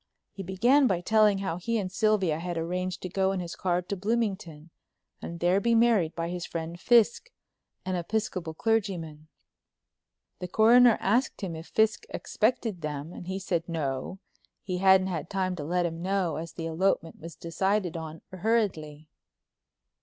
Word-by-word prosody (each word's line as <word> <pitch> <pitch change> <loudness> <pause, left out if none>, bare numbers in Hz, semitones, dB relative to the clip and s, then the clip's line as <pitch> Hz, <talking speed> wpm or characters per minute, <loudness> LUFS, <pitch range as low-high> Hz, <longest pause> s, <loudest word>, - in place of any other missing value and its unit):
He 195 - -8
began 240 +10 +3
by 185 -5 0
telling 215 +1 +4
how 190 -4 -3
he 230 +6 -1
and 190 -4 -3
Sylvia 195 -6 +1
had 175 0 -4
arranged 180 +2 -3
to - - -2
go 190 +1 +1
in 195 - -2
his 175 -1 -6
car 180 -1 0
to 200 - -4
Bloomington, 195 -7 -2 0.5
and 170 0 -7
there 180 +3 +3
be 235 +3 +2
married 225 -8 +3
by 165 0 -3
his 175 0 -4
friend 170 0 -5
Fiske, 240 - +3 0.5
an 185 - -2
Episcopal 180 -2 -2
clergyman. 175 -8 -1 1.1
The 180 - -4
Coroner 230 +4 +6
asked 235 +7 0
him 180 -5 -4
if 160 +1 -9
Fiske 220 0 +1
expected 220 -4 -1
them 150 +2 -5
and 175 - -9
he 190 +1 -3
said 175 -3 -2
no, 150 +1 -3 0.5
he 185 -2 -3
hadn't 190 0 +5
had 175 -3 -4
time 185 -2 -1
to 150 - -4
let 175 +3 0
him 165 0 -4
know 185 -2 0
as 165 +1 -6
the 165 - -6
elopement 165 0 0
was 165 0 -9
decided 185 +2 -1
on 160 -1 -7
hurriedly. 180 -7 -1
185 Hz, 165 wpm, -28 LUFS, 165-210 Hz, 1.1 s, Coroner